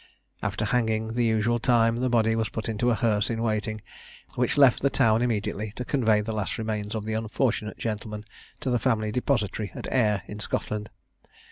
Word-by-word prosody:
After -, -, -1 dB
hanging 110 Hz, -2 st, 0 dB
the 120 Hz, +2 st, 0 dB
usual 115 Hz, +1 st, +2 dB
time, 115 Hz, -1 st, +3 dB
the 130 Hz, +1 st, 0 dB
body 115 Hz, -2 st, +3 dB
was 110 Hz, -1 st, 0 dB
put 110 Hz, -, -4 dB
into 115 Hz, +2 st, 0 dB
a 120 Hz, -, +3 dB
hearse 110 Hz, -3 st, +1 dB
in 115 Hz, -1 st, -2 dB
waiting, 110 Hz, -1 st, -1 dB, 0.5 s
which 125 Hz, +3 st, 0 dB
left 135 Hz, -4 st, +6 dB
the 140 Hz, -, +3 dB
town 115 Hz, -3 st, +3 dB
immediately, 110 Hz, -3 st, -1 dB
to 125 Hz, -, -4 dB
convey 110 Hz, -7 st, +2 dB
the 110 Hz, +1 st, -4 dB
last 105 Hz, -3 st, -2 dB
remains 110 Hz, -1 st, -3 dB
of 110 Hz, -1 st, -3 dB
the 110 Hz, -, -2 dB
unfortunate 110 Hz, 0 st, -1 dB
gentleman 105 Hz, -1 st, -4 dB, 0.4 s
to 130 Hz, -, -1 dB
the 120 Hz, -, +2 dB
family 110 Hz, -2 st, +1 dB
depository 110 Hz, -4 st, -1 dB
at -, -, -6 dB
Ayr, 105 Hz, -7 st, +2 dB
in 105 Hz, -, -8 dB
Scotland. 105 Hz, +1 st, -3 dB
110 Hz, 190 wpm, -26 LUFS, 105-120 Hz, 0.5 s, left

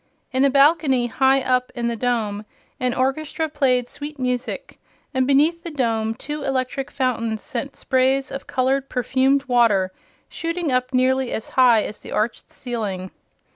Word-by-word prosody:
In 260 Hz, +1 st, +2 dB
a 280 Hz, -, +5 dB
balcony 275 Hz, -2 st, +4 dB
high 265 Hz, +3 st, +3 dB
up 255 Hz, -1 st, 0 dB
in 240 Hz, -1 st, -1 dB
the 235 Hz, -, -1 dB
dome 220 Hz, -4 st, -1 dB, 0.4 s
an 250 Hz, -1 st, 0 dB
orchestra 310 Hz, +4 st, -1 dB
played 260 Hz, -5 st, +1 dB
sweet 290 Hz, +2 st, -7 dB
music, 250 Hz, -1 st, -3 dB, 0.3 s
and 260 Hz, -1 st, +1 dB
beneath 300 Hz, +5 st, +3 dB
the 340 Hz, -, -6 dB
dome 225 Hz, -6 st, -1 dB
two 295 Hz, +4 st, -6 dB
electric 270 Hz, 0 st, -2 dB
fountains 230 Hz, -5 st, -1 dB
sent 260 Hz, +3 st, -5 dB
sprays 265 Hz, +1 st, +1 dB
of 275 Hz, -, -6 dB
colored 265 Hz, +1 st, 0 dB
perfumed 265 Hz, +3 st, +2 dB
water 230 Hz, -8 st, +3 dB, 0.4 s
shooting 335 Hz, -2 st, -3 dB
up 255 Hz, 0 st, 0 dB
nearly 260 Hz, 0 st, +2 dB
as 220 Hz, -, -4 dB
high 240 Hz, -4 st, +5 dB
as 210 Hz, -, -7 dB
the -, -, -10 dB
arched 220 Hz, +3 st, -2 dB
ceiling. 205 Hz, -7 st, -4 dB
260 Hz, 155 wpm, -22 LUFS, 240-275 Hz, 0.4 s, a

